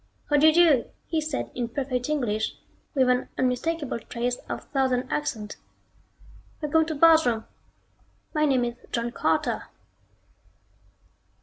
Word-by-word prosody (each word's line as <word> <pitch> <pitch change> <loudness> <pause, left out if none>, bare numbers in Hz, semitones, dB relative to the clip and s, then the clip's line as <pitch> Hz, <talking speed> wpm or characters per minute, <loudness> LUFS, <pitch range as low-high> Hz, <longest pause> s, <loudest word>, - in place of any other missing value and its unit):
"How 295 - +5
do 300 +2 +6
you 315 - +6
do?" 320 -7 +5 0.2
he 320 -2 -1
said 305 -2 -3
in 245 -1 -2
perfect 250 0 -2
English, 225 -8 -1 0.4
with 260 -2 +4
an 250 0 +1
unmistakable 260 +2 -1
trace 240 +2 -3
of - - -5
Southern 260 -2 +1
accent. 220 -8 -3 1.0
"Welcome 315 +1 +2
to 315 - -3
Barsoom! 295 -8 +5 0.9
My 305 -1 +2
name 260 -4 +2
is 240 - -3 0.2
John 235 0 -1
Carter." - - 0
260 Hz, 125 wpm, -26 LUFS, 245-305 Hz, 1.0 s, do